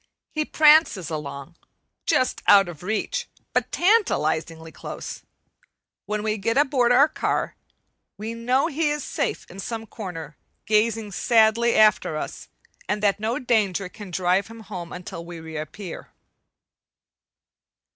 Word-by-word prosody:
He 305 0 -1
prances 300 - +4
along, 150 +1 -6 0.5
just 255 -5 +1
out 200 -2 +7
of 170 -4 -9
reach, 220 - -2 0.3
but - - 0
tantalizingly 165 - +1
close; - - -7 0.9
when 210 0 -2
we 215 0 -1
get 230 +5 0
aboard 265 -4 +3
our 270 +4 +6
car, 310 - -2 0.6
we 220 +3 -5
know 250 +4 +1
he 320 -1 0
is 295 -1 -2
safe - - -2
in 190 - -11
some 225 +3 -5
corner 180 -8 -7 0.3
gazing 220 0 +1
sadly 230 +2 +3
after 215 -7 +4
us, - - -6 0.4
and 210 0 -1
that 205 -1 +2
no 225 +3 -1
danger 200 -6 0
can 205 0 -10
drive 180 +2 +1
him 225 0 -11
home 180 -5 -7
until 180 -1 -7
we 170 0 -9
reappear. 160 +3 -7
215 Hz, 130 wpm, -24 LUFS, 180-240 Hz, 0.9 s, out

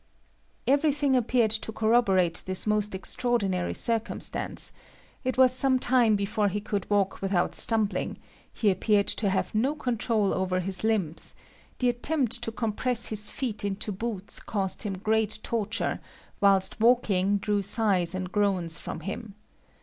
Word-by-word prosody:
Everything 285 0 +2
appeared 240 -2 +2
to 220 0 -2
corroborate 215 -6 +2
this 185 -1 -1
most 210 -2 0
extraordinary 195 -3 -1
circumstance; 230 -1 -1 0.5
it 255 -1 -2
was 260 -1 +6
some 260 0 +3
time 245 -4 +3
before 205 +1 0
he 205 +1 -2
could 205 -2 -4
walk 200 -2 0
without 195 -2 0
stumbling; 220 -3 +1 0.3
he 210 -3 +1
appeared 200 +2 +2
to 205 - 0
have 190 - -1
no 255 +8 +1
control 230 -7 0
over 185 -1 -1
his 190 +1 -2
limbs; 200 -8 -1 0.4
the 250 - +1
attempt 245 0 0
to 225 - -3
compress 230 +2 +1
his 210 -1 -1
feet 225 -6 -4
into 205 +1 -3
boots 205 0 -4
caused 195 -3 -3
him 195 -3 -3
great 215 +1 0
torture, 225 -1 -2 0.4
whilst 195 -1 +3
walking 205 -5 +3
drew 205 0 0
sighs 195 -4 +1
and 185 -1 -4
groans 185 -5 0
from - - -6
him. 205 +1 -6
210 Hz, 140 wpm, -27 LUFS, 195-235 Hz, 0.5 s, was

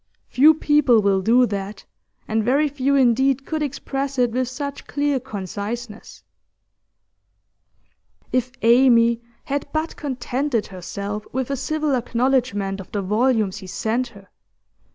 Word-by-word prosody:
Few 305 +5 +6
people 295 -6 +4
will 195 -1 +2
do 240 +6 +4
that, 200 -2 -5 0.4
and 220 0 0
very 275 +6 +2
few 280 -1 0
indeed 265 +1 +3
could 315 -1 -3
express 275 -1 -3
it 245 -2 +2
with 255 +2 -1
such 280 +2 -6
clear 285 -2 0
conciseness.' 210 - -7 2.1
If 255 0 0
Amy 235 -1 +5 0.2
had 285 +1 -3
but 315 +1 -2
contented 260 -3 -2
herself 200 +3 -6
with 260 +1 -2
a - - 0
civil 300 +2 -1
acknowledgment 240 -5 0
of 190 - -10
the 205 -2 -2
volumes 215 0 +1
he 190 - -9
sent 225 +6 -1
her! 200 -4 -16
245 Hz, 130 wpm, -22 LUFS, 210-275 Hz, 2.1 s, Few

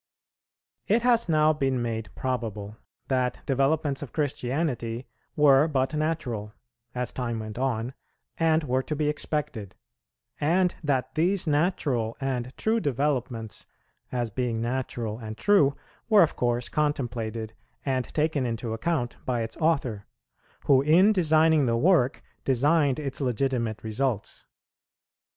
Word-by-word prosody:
It 225 +3 +2
has 235 -6 +3
now 155 -1 +4
been 135 -4 0
made 115 -3 -3
probable 110 -5 -3 0.3
that 130 -2 -1
developments 140 +1 +1
of 145 - -8
Christianity 130 -4 -2 0.3
were 145 -1 +5
but 135 -2 0
natural, 140 -9 -2 0.4
as 125 -1 -2
time 120 -2 -3
went 110 +1 -6
on, 125 -1 -1 0.5
and 165 -1 +3
were 130 -2 +1
to 150 - -4
be 150 0 0
expected; 145 - -3 0.6
and 175 +4 +2
that 135 -4 0
these 175 +4 +1
natural 145 -8 0
and 130 -2 -3
true 225 +1 +1
developments, 130 - -2 0.4
as 120 -3 -2
being 120 0 -1
natural 120 -2 -3
and 110 -1 -7
true, 150 -10 +4 0.3
were 210 -4 +7
of 160 - 0
course 120 0 0
contemplated 115 -7 -2 0.3
and 130 -3 0
taken 155 -2 0
into 115 -1 -3
account 125 -1 -2
by 120 -3 -1
its 110 - -6
Author, 140 -11 0 0.6
who 135 -2 +5
in 175 +9 +5
designing 160 -5 +4
the 115 0 +2
work 150 -3 +3 0.2
designed 140 +1 +2
its 145 -2 -4
legitimate 125 -3 -1
results. 110 0 -2
135 Hz, 130 wpm, -26 LUFS, 120-155 Hz, 0.6 s, were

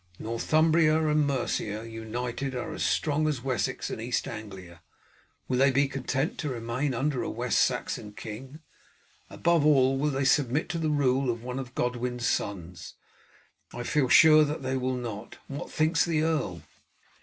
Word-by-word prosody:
Northumbria 155 +6 +2
and 150 -1 +2
Mercia 115 -5 -2
united 120 +4 -4
are 125 - -4
as - - -6
strong 155 0 +1
as 140 -6 -2
Wessex 130 -5 -2
and - - -5
East 120 +2 -1
Anglia. 95 -6 -9 0.7
Will 125 -1 0
they 135 +1 +5
be 140 +2 +2
content 135 +2 -2
to 150 - -2
remain 125 +3 -2
under 135 +1 0
a - - -3
West 120 +1 0
Saxon 105 - -1
king? 115 +9 -9 0.7
Above 170 -2 +2
all, 135 -3 +4
will 150 +2 +1
they 135 -1 -1
submit 135 +1 +2
to 170 - -2
the 160 -1 0
rule 135 -3 +2
of 115 -1 -3
one 125 +1 -4
of 125 -1 -8
Godwin's 125 0 -2
sons? 90 -7 -3 0.8
I 120 - -4
feel 135 +1 +1
sure 155 +1 +8
that 150 -1 -3
they 130 0 -1
will 130 0 -1
not. 115 -3 -6
What 140 +1 -6
thinks 155 +2 +2
the 160 -3 0
earl?" 135 - -1
130 Hz, 165 wpm, -28 LUFS, 115-150 Hz, 0.8 s, sure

